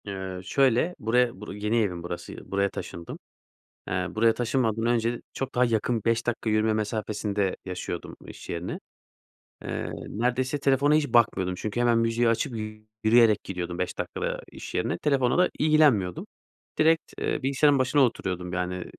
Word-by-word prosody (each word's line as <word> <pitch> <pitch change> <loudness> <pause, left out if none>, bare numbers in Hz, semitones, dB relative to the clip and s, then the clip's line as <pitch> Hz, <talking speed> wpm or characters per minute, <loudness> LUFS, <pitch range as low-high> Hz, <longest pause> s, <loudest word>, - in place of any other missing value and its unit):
Eee, 95 -2 -5
şöyle; 135 - +2
buraya, 120 -1 +1
bur 105 - -7
yeni 105 +3 -1
evim 90 -5 -2
burası, 85 0 -7
buraya 100 0 +2
taşındım. 85 -2 -7 0.7
Eee, 90 0 -1
buraya 115 +1 +3
taşınmadan 115 -2 0
önce 120 0 +1
çok 135 0 -4
daha 125 +1 +4
yakın, 115 0 0
5 115 0 +1
dakika 120 -1 -1
yürüme 110 0 +2
mesafesinde 105 -2 -1
yaşıyordum 90 -2 -5
iş - - -11
yerine. 85 +1 -4 0.8
Eee, - - -4 0.2
neredeyse 125 +5 -1
telefona 140 +2 +3
hiç 155 -1 +2
bakmıyordum 105 -7 +2
çünkü 110 +5 -4
hemen 120 -1 +3
müziği 115 +1 +2
açıp 115 +2 0 0.5
yürüyerek 110 -1 +5
gidiyordum 90 -2 -5
5 90 - -2
dakikada - - -3
iş - - -9
yerine, - - 0
telefonla 135 -2 +1
da 180 - +4
ilgilenmiyordum. 145 - +3 0.5
Direkt 160 +1 +2
bilgisayarın 140 +1 +2
başına 130 +3 +3
oturuyordum, 90 -8 -1
yani, 90 0 -2
115 Hz, 145 wpm, -26 LUFS, 95-125 Hz, 0.8 s, yürüyerek